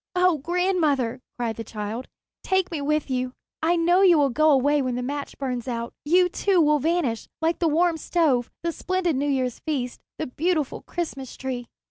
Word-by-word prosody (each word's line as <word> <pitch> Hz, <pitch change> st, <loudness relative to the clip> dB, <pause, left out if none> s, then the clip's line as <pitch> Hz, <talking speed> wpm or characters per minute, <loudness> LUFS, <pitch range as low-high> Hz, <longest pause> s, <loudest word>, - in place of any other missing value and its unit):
"Oh, 360 Hz, -3 st, +3 dB
grandmother," 310 Hz, -7 st, +1 dB, 0.2 s
cried 230 Hz, -3 st, -2 dB
the 225 Hz, -, -4 dB
child, 220 Hz, +3 st, -5 dB, 0.4 s
"take 380 Hz, -1 st, +1 dB
me 315 Hz, -4 st, -3 dB
with 300 Hz, +1 st, 0 dB
you. 255 Hz, 0 st, -1 dB, 0.3 s
I 330 Hz, +2 st, +3 dB
know 350 Hz, +2 st, +3 dB
you 360 Hz, -4 st, +6 dB
will 280 Hz, -3 st, +3 dB
go 310 Hz, +5 st, +3 dB
away 285 Hz, +1 st, +4 dB
when 255 Hz, -2 st, -1 dB
the 250 Hz, -, -2 dB
match 285 Hz, +2 st, -4 dB
burns 255 Hz, -3 st, -3 dB
out. 235 Hz, -1 st, -3 dB
You, 360 Hz, +4 st, +4 dB
too, 375 Hz, +1 st, +1 dB
will 300 Hz, -2 st, +4 dB
vanish, 300 Hz, -6 st, 0 dB
like 325 Hz, +1 st, 0 dB
the 340 Hz, -, +2 dB
warm 330 Hz, +2 st, +2 dB
stove, 290 Hz, -7 st, +1 dB
the 340 Hz, -, 0 dB
splendid 365 Hz, -1 st, -1 dB
New 285 Hz, +2 st, 0 dB
Year's 255 Hz, -3 st, -1 dB
feast, 260 Hz, -6 st, -3 dB, 0.2 s
the 315 Hz, -, -2 dB
beautiful 310 Hz, +2 st, -1 dB
Christmas 275 Hz, -7 st, -5 dB
Tree." 250 Hz, -2 st, -4 dB
295 Hz, 185 wpm, -25 LUFS, 255-340 Hz, 0.4 s, you